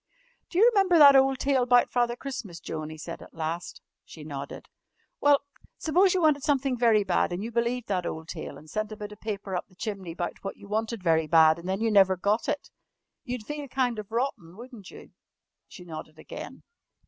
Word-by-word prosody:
"Do 345 - -5
you 440 +5 +7
remember 385 -4 +4
that 285 -3 +9
ole 270 0 +5
tale 265 -2 +1
'bout 245 -1 +4
Father 240 -1 +1
Christmas, 240 -10 -7
Joan?" 155 -1 -5
he 155 - -9
said 165 +2 -8
at - - -14
last. 165 +2 -4 0.2
She 155 - -12
nodded. 140 -2 -7 0.5
"Well, 285 -1 +4 0.4
s'pose 365 +4 +3
you 360 - +1
wanted 300 -2 +4
somethin' 275 -2 +1
very 230 -3 +3
bad, 185 -2 +1
an' 175 +3 -3
you 230 - -5
believed 235 +1 -1
that 185 -3 -1
ole 160 0 -5
tale 165 -1 -7
and 155 - -15
sent 215 +6 -3
a 215 - -7
bit 210 -1 -7
of 210 - -12
paper 200 -3 -4
up 180 - -3
the 185 - -24
chimney 195 -5 -5
'bout 175 0 -5
what 195 - -5
you - - -13
wanted 220 0 -2
very 160 -2 +2
bad 160 +1 +5
and 175 +2 -7
then 190 +3 -1
you 225 -1 +1
never 190 -2 +5
got 205 +5 0
it, 290 - -3 0.5
you'd 245 -4 -5
feel 295 +1 -5
kind 250 -3 -1
of 210 0 -8
rotten, 225 -8 -3
wouldn't 235 -5 -11
you?" - - -13 0.6
She 180 - -12
nodded 155 -2 -9
again. - - -9
215 Hz, 210 wpm, -27 LUFS, 175-255 Hz, 0.6 s, that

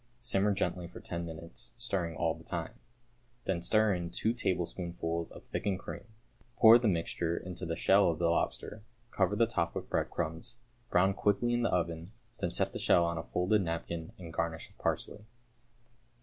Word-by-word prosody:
Simmer 105 -4 +2
gently 90 -3 -1
for - - -10
ten 85 -1 -4
minutes, 80 +1 -8
stirring 95 -8 -1
all - - +1
the - - -13
time. - - -4 0.7
Then 90 -3 0
stir 110 +3 +3
in 85 -1 -3
two 110 +6 0
tablespoonfuls 85 -5 -2
of - - -11
thickened 100 -2 -2
cream. - - -7 0.5
Pour 115 +1 +9
the 120 - +1
mixture 85 -2 0
into 90 -1 -6
the 85 - -1
shell 95 +2 +5
of 80 - -1
the 85 - +2
lobster, 105 +5 -1 0.3
cover 95 +1 +2
the 115 - +4
top 85 -8 -1
with - - -5
breadcrumbs, 80 +7 -2 0.3
brown 95 +2 +4
quickly 105 +5 +1
in 120 - +2
the 120 - +2
oven, 85 +2 -1 0.3
then 85 - 0
set - - 0
the - - -4
shell 85 - +4
on 85 -1 -1
a - - -4
folded 95 +4 +2
napkin, 85 -1 -3
and 85 -3 -9
garnish 80 -1 -2
with - - -26
parsley. 105 - -2
90 Hz, 180 wpm, -32 LUFS, 85-105 Hz, 0.7 s, Pour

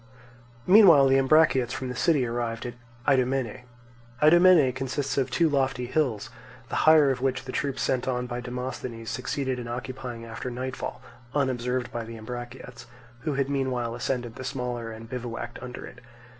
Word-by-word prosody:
Meanwhile 180 -8 +8
the 135 0 +5
Ambraciots 135 -3 +4
from 130 -1 -4
the 125 - -5
city 145 -1 +2
arrived 115 0 -3
at 120 - -4 0.3
Idomene. 130 -3 +1 0.5
Idomene 160 -3 +6
consists 135 +2 -2
of 135 -2 0
two 170 - +2
lofty 135 -4 0
hills, 125 -5 -1 0.4
the - - -3
higher 150 -3 +6
of 125 -1 -3
which 130 -1 0
the 130 - -5
troops 135 -1 -2
sent 130 -1 0
on 125 -1 -1
by 120 0 -4
Demosthenes 125 -2 -5
succeeded 130 +1 -2
in 120 - -6
occupying 120 0 -6
after 115 +2 -6
nightfall, 130 +1 -5 0.3
unobserved 125 -3 -1
by 120 - -4
the 115 0 -9
Ambraciots, 120 +2 -8 0.3
who 145 +2 -2
had 135 -1 0
meanwhile 130 -4 -1
ascended 120 -1 -3
the 130 - -6
smaller 125 -3 -4
and 110 +1 -9
bivouacked 120 -1 -6
under 125 -1 -7
it. - - -12
125 Hz, 160 wpm, -26 LUFS, 120-135 Hz, 0.5 s, Meanwhile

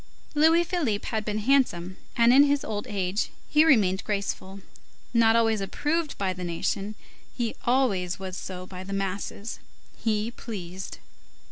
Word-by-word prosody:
Louis 320 +3 +5
Philippe 315 - -1
had 220 -2 -1
been 210 0 -2
handsome, 210 -7 +2 0.2
and 235 +1 +6
in 275 - +8
his 285 0 +1
old 210 -1 -3
age 195 0 -1 0.2
he 300 +1 +5
remained 205 -12 +4
graceful; 200 -1 -3 0.5
not 225 -1 +5
always 225 -2 +3
approved 300 - -1
by 190 -2 0
the 180 0 -7
nation, 195 +4 -2 0.4
he 235 -3 -1
always 205 -9 +2
was 190 -1 -6
so 185 0 -6
by 185 0 -8
the 195 +1 -6
masses; 195 +2 -3 0.4
he 215 0 -1
pleased. 190 -6 -7
210 Hz, 145 wpm, -27 LUFS, 190-245 Hz, 0.5 s, in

